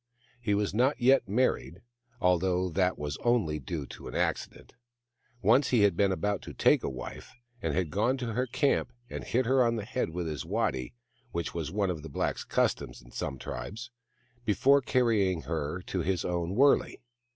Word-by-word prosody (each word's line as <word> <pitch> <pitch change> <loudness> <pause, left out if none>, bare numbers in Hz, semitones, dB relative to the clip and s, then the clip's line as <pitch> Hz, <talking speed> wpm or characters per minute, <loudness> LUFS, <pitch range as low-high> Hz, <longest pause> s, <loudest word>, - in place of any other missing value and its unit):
He 105 -4 +1
was 100 -1 0
not 130 +6 +2
yet 130 -3 +4
married, 105 -5 0 0.4
although 90 0 +2
that 90 +1 +1
was 75 -1 -4
only 110 -11 +1
due 75 +1 -4
to - - -10
an - - -7
accident. - - -2 0.7
Once 120 +8 +5
he 120 -4 +3
had 100 -4 +4
been 100 +1 +3
about 100 +1 -1
to - - -9
take - - +4
a - - -1
wife, 65 -2 -8 0.3
and - - -1
had 90 -5 0
gone 120 - +1
to 120 -3 -3
her 125 +3 0
camp 140 +4 +1 0.2
and - - -5
hit 125 +2 0
her 130 +1 +4
on 115 -1 +2
the 105 -3 -4
head 125 -4 -2
with 85 +1 -4
a 75 -3 -4
waddy, 65 -2 -1 0.4
which 85 -1 -3
was 80 -3 -3
one 100 -1 +1
of 80 -4 -5
the 80 - -8
blacks' 70 - -2
customs - - 0
in - - -17
some 65 - -4
tribes, 65 - -6 0.5
before 135 +6 +4
carrying 110 -10 +2
her 80 +2 -3
to 95 - -3
his 90 +1 -1
own 90 +1 -1
wurley. 140 +4 +4
95 Hz, 185 wpm, -29 LUFS, 85-120 Hz, 0.7 s, Once